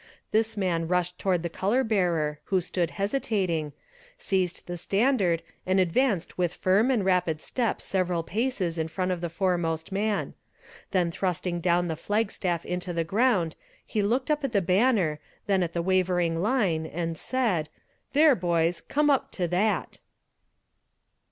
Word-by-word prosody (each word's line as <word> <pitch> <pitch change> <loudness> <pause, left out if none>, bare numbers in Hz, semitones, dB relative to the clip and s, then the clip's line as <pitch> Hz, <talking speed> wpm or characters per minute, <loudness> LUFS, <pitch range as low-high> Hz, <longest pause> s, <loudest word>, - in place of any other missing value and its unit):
This 220 0 +1
man 170 -4 0
rushed 180 0 0
toward 180 -3 +1
the - - 0
color 205 +10 +1
bearer, 170 -9 0
who 190 - +2
stood 175 -1 -1
hesitating, 195 - -1 0.5
seized 185 -3 -1
the 175 - -5
standard 195 -2 +1 0.2
and 185 +1 +2
advanced 185 0 +1
with 175 -1 0
firm 200 +7 +3
and 230 -7 +1
rapid 180 -4 +1
step 235 +7 -1
several 180 -3 0
paces 190 -4 -1
in 160 - 0
front 185 +3 -2
of 180 -2 -2
the 170 - -2
foremost 170 -2 -1
man; 205 +1 -1 0.6
then 180 -3 +1
thrusting 180 -1 -2
down 175 0 +2
the 160 - -2
flag 210 +5 -1
staff 175 -3 -2
into 180 0 -3
the 165 0 0
ground 190 -3 +1 0.3
he 215 - -1
looked 245 +8 0
up 300 -1 0
at 270 -3 -2
the 200 - +4
banner, 185 -4 +2 0.3
then 195 -2 +2
at 170 -2 -1
the 170 - -1
wavering 180 -2 +1
line, 190 -8 +1
and 165 +1 -3
said 190 -8 -1 0.4
"There, 300 +1 +6
boys, 170 -4 0
come 295 0 +2
up 275 - +1
to 180 -2 -1
that!" 200 +5 0
180 Hz, 160 wpm, -27 LUFS, 170-210 Hz, 0.6 s, There